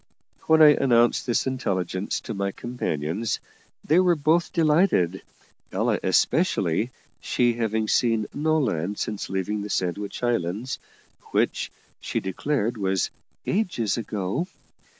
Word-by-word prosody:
When 160 0 +6
I 150 - +10
announced 120 -5 +3
this 120 - +1
intelligence 95 -7 -2
to 115 - -5
my 100 -1 -1
companions, 105 -3 -3 0.5
they 160 +4 +4
were 180 -2 +4
both 160 +3 +2
delighted, 155 - +2 0.5
Ella - - +1
especially, 85 +9 +2 0.3
she 120 -1 +1
having 110 -1 -1
seen 115 -1 +2
no 155 +2 +1
land 105 - -1
since 105 -2 -3
leaving 95 +2 -2
the 105 - -5
Sandwich 100 +4 -2
Islands, 115 +1 -1 0.5
which, - - +1 0.3
she - - -2
declared, 115 +4 -1
was 95 -2 0 0.3
"ages 175 - 0
ago." 110 - -2
115 Hz, 120 wpm, -25 LUFS, 95-140 Hz, 0.5 s, I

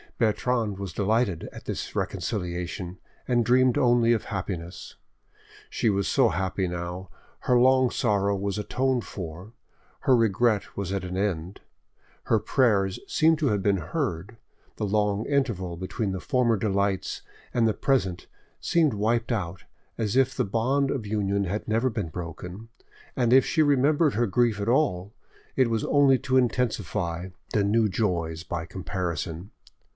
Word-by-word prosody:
Bertrande 115 -2 0
was 95 -4 -6
delighted 105 -3 0
at - - -11
this - - -5
reconciliation, 90 -2 -3 0.3
and 120 -2 +2
dreamed 125 +1 +4
only 120 -1 +4
of 115 - -1
happiness. 95 -4 -5 0.7
She 115 - 0
was 100 -1 0
so 130 -4 +3
happy 95 0 -1
now, 90 +1 -5 0.3
her 125 - +3
long 130 0 +5
sorrow 100 -6 +1
was 100 +1 -2
atoned 130 +3 0
for, 90 +3 -8 0.5
her 130 - +4
regret 115 -1 +1
was 100 -2 -3
at 100 -1 -2
an 90 0 -4
end, 95 -2 -2 0.6
her - - +3
prayers 100 -8 +2
seemed 160 -1 +3
to 150 - +1
have 105 -5 +1
been 100 -1 +3
heard, 105 - -3 0.4
the - - -1
long 105 0 0
interval 115 -12 -1
between 95 +3 -3
the 95 - -3
former 125 -2 +1
delights 100 -1 -1 0.3
and 115 -2 +3
the 110 - +2
present 95 -11 0 0.3
seemed 160 -6 +2
wiped 115 +3 0
out 95 -6 -3 0.3
as 110 0 -1
if 135 +1 +3
the - - 0
bond 130 +7 +1
of 125 -6 -3
union 100 -1 0
had 100 +4 -3
never 115 +4 +1
been 105 -6 -3
broken, 90 +6 -7 0.5
and 120 -2 +2
if 130 0 +6
she 160 - +1
remembered 145 +2 +3
her 120 +2 +2
grief 115 0 +1
at 100 +2 -1
all, 105 -8 +1 0.4
it 130 -3 +3
was 115 -1 0
only 140 -2 +4
to 130 -1 +1
intensify 105 -8 -1 0.2
the 105 - +3
new 110 +2 +3
joys 85 -5 -1
by 85 -1 -4
comparison. 85 0 -4
105 Hz, 150 wpm, -26 LUFS, 95-125 Hz, 0.7 s, if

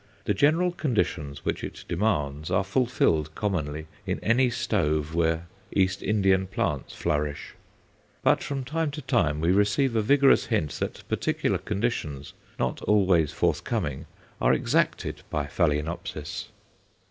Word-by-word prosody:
The - - +2
general 160 - +3
conditions 90 - -2
which - - -1
it - - -7
demands 80 -6 -1
are 95 +2 +2
fulfilled, 90 - +1
commonly, 80 -7 -2 0.2
in - - -1
any 125 +3 +3
stove 80 -10 0
where 80 0 +1 0.3
East 95 -1 +1
Indian 95 -3 +2
plants 75 -7 -2
flourish; 75 0 -2 0.7
but - - +4
from 140 -2 -3
time 160 +4 -1
to 150 +1 -6
time 90 - +1
we 85 +2 +3
receive 105 +6 +2
a 110 - +3
vigorous 140 +5 +4
hint 105 - 0
that - - -4
particular - - 0
conditions, 75 - -3 0.2
not 65 - -1
always 95 -7 +3
forthcoming, 70 -2 -1 0.3
are - - +4
exacted 65 - 0
by 75 -1 -1
Phaloenopsis. 75 +3 -2
95 Hz, 130 wpm, -26 LUFS, 75-115 Hz, 0.7 s, but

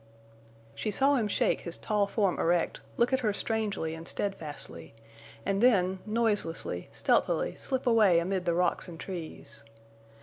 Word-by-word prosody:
She 215 - -3
saw 270 +7 +3
him 235 -6 +2
shake - - +1
his 170 - -4
tall 210 -2 0
form 200 -3 0
erect, 170 0 +1 0.2
look 240 +2 +2
at 260 - +3
her 215 -5 0
strangely 205 -7 -1
and 165 +1 -8
steadfastly, 150 - -5 0.5
and 195 +1 0
then, 190 -6 +4
noiselessly, 210 -6 0
stealthily - - +1
slip 260 -1 -3
away 220 -7 +5
amid 180 +2 0
the 170 - +1
rocks 180 +2 +1
and 165 -2 -9
trees. 175 -5 -7
200 Hz, 145 wpm, -29 LUFS, 170-225 Hz, 0.5 s, away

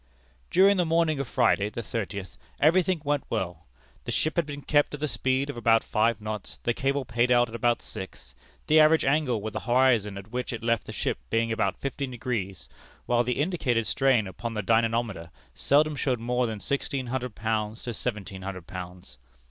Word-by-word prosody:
"During 195 +2 +5
the 180 - +3
morning 160 -2 +2
of 140 - -2
Friday, 105 -2 +2
the 115 - -6
thirtieth, 100 -6 -5 0.2
every 165 +5 +5
thing 175 -3 -1
went 145 -1 +1
well; 85 -3 -3 0.4
the - - -3
ship 155 - 0
had 170 -4 +1
been 145 -1 -7
kept 145 +1 +2
at - - -10
the 150 - -1
speed 130 0 0
of 145 - -5
about 115 -1 +4
five 115 +1 +1
knots, 105 0 -6
the 120 - -1
cable 135 +2 -1
paid 120 +2 +1
out 120 -1 +4
at - - -12
about 120 +1 +1
six, 95 - -9 0.3
the 155 +1 +5
average 155 +1 +5
angle 135 -6 +1
with 110 -1 -4
the - - -2
horizon 120 -5 +2
at 100 +3 -10
which 125 0 -3
it 115 - -6
left 115 -1 0
the - - -5
ship - - -2
being 115 0 +1
about 110 0 0
fifteen 140 0 -3
degrees, 110 -7 -4 0.4
while 120 0 +2
the 125 +2 -2
indicated 145 -9 0
strain 130 -4 +2
upon 115 +5 -6
the 105 - -2
dynamometer 115 -5 +1 0.2
seldom 150 - +2
showed 130 -3 0
more 125 +1 0
than 110 -2 -4
sixteen 140 +3 -2
hundred 125 -2 -3
pounds 110 0 -2
to 120 - -4
seventeen 100 -5 -4
hundred 95 -2 -6
pounds. 90 -9 -9
120 Hz, 195 wpm, -27 LUFS, 110-140 Hz, 0.4 s, During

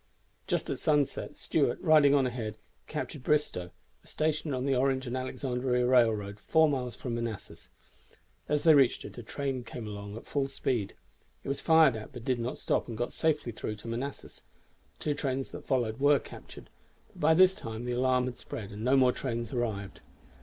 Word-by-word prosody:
Just - - -1
at - - -3
sunset, 145 -3 0
Stuart, - - 0
riding 150 -3 +5
on 135 -2 +3
ahead, 115 -4 -4 0.3
captured 150 -2 -5
Bristoe, 130 -12 0 0.3
a - - -22
station 155 0 -1
on 130 -1 -1
the 135 -1 +2
Orange 130 +1 +1
and 120 0 -3
Alexandria 125 -1 -1
Railroad 110 -5 +2
four 160 +8 +4
miles 130 -4 -2
from 125 - -5
Manassas. 115 -4 -5 0.8
As 150 0 +1
they 160 - +7
reached 135 -4 +4
it - - -9
a - - -5
train 135 +2 -3
came 115 -1 -7
along 100 0 -7
at - - -10
full 140 -2 -1
speed. 120 -6 -2 0.5
It - - -6
was 140 - -2
fired 160 -6 +5
at, 110 +5 -8
but 120 -2 -9
did 130 -2 +1
not 120 +2 -3
stop, - - 0
and 115 -3 -6
got 120 +1 -2
safely 150 -6 0
through 110 -1 -5
to 105 +2 -11
Manassas. 125 +5 -5 0.6
Two 150 - -1
trains 135 -2 -2
that - - -9
followed 120 -3 0
were 145 +1 +5
captured; - - -11 0.4
but - - -18
by 160 +2 +5
this 185 +2 +6
time 115 -7 -6
the 125 - -2
alarm 125 +1 +2
had 125 -1 -5
spread, 105 -1 -7
and 105 +1 -7
no 130 +3 +4
more 130 -1 +5
trains 120 -3 -4
arrived. 105 -5 -3
125 Hz, 190 wpm, -30 LUFS, 115-140 Hz, 0.8 s, they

